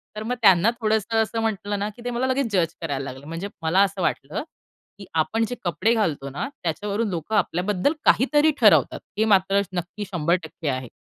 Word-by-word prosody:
तर 215 Hz, -, -5 dB
मग 235 Hz, +3 st, -2 dB
त्यांना 195 Hz, -1 st, +6 dB
थोडंसं 220 Hz, +1 st, +1 dB
असं 225 Hz, +1 st, -3 dB
म्हंटलं 205 Hz, -2 st, -2 dB
ना 205 Hz, +1 st, -1 dB
की 240 Hz, -, -13 dB
ते 245 Hz, -, -1 dB
मला 245 Hz, +2 st, -1 dB
लगेच 260 Hz, -3 st, 0 dB
जज 170 Hz, -2 st, +1 dB
करायला 140 Hz, -4 st, -3 dB
लागले. 135 Hz, +2 st, -12 dB
म्हणजे 165 Hz, +5 st, -5 dB
मला 165 Hz, +4 st, +3 dB
असं 195 Hz, -1 st, -2 dB
वाटतं 160 Hz, -, -2 dB, 0.6 s
की 200 Hz, -, -9 dB
आपण 165 Hz, +8 st, +1 dB
जे 245 Hz, -, -4 dB
कपडे 185 Hz, +6 st, +1 dB
घालतो 160 Hz, -11 st, -1 dB
ना 145 Hz, -, -4 dB, 0.2 s
त्याच्यावरून 205 Hz, +6 st, -1 dB
लोकं 175 Hz, +4 st, -3 dB
आपल्याबद्दल 185 Hz, -, +1 dB
काहीतरी 295 Hz, +4 st, +4 dB
ठरवतात, 215 Hz, -3 st, +5 dB, 0.2 s
हे 220 Hz, -, +3 dB
मात्र 195 Hz, -1 st, +3 dB
नक्की 180 Hz, +4 st, -4 dB
100% 165 Hz, -2 st, -1 dB
आहे. 130 Hz, -2 st, -3 dB
195 Hz, 185 wpm, -24 LUFS, 165-220 Hz, 0.6 s, त्यांना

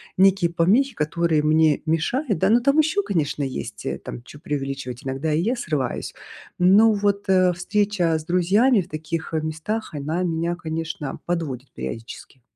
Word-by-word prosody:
некие 190 Hz, -2 st, +4 dB
помехи, 225 Hz, +10 st, +3 dB
которые 155 Hz, 0 st, +1 dB
мне 155 Hz, -1 st, +3 dB
мешают. 205 Hz, -, 0 dB
Да, 190 Hz, -, +3 dB
но 240 Hz, +2 st, +4 dB
там 280 Hz, +4 st, +2 dB
еще, 320 Hz, +7 st, +2 dB
конечно, 150 Hz, -6 st, -1 dB
есть, 135 Hz, -, -5 dB
э, -, -, -2 dB
там 120 Hz, -, -8 dB
чё 145 Hz, -, -13 dB
преувеличивать. 135 Hz, -4 st, -4 dB
Иногда 135 Hz, +4 st, -2 dB
и 160 Hz, -, +2 dB
я 235 Hz, +6 st, 0 dB
срываюсь. 150 Hz, -, -3 dB, 0.5 s
Но 205 Hz, +5 st, +6 dB
вот, 200 Hz, 0 st, 0 dB
э, 185 Hz, -1 st, +4 dB
встреча 185 Hz, -2 st, 0 dB
с 155 Hz, -, -7 dB
друзьями 195 Hz, +8 st, +3 dB
в 180 Hz, -, -3 dB
таких, 160 Hz, +1 st, -5 dB
э, 160 Hz, -, 0 dB
местах, 160 Hz, +6 st, -4 dB
она 155 Hz, +5 st, -2 dB
меня, 170 Hz, 0 st, -1 dB
конечно, 160 Hz, -4 st, -5 dB
подводит 145 Hz, -7 st, -3 dB
периодически. 115 Hz, -, -8 dB
165 Hz, 160 wpm, -23 LUFS, 150-200 Hz, 0.5 s, Но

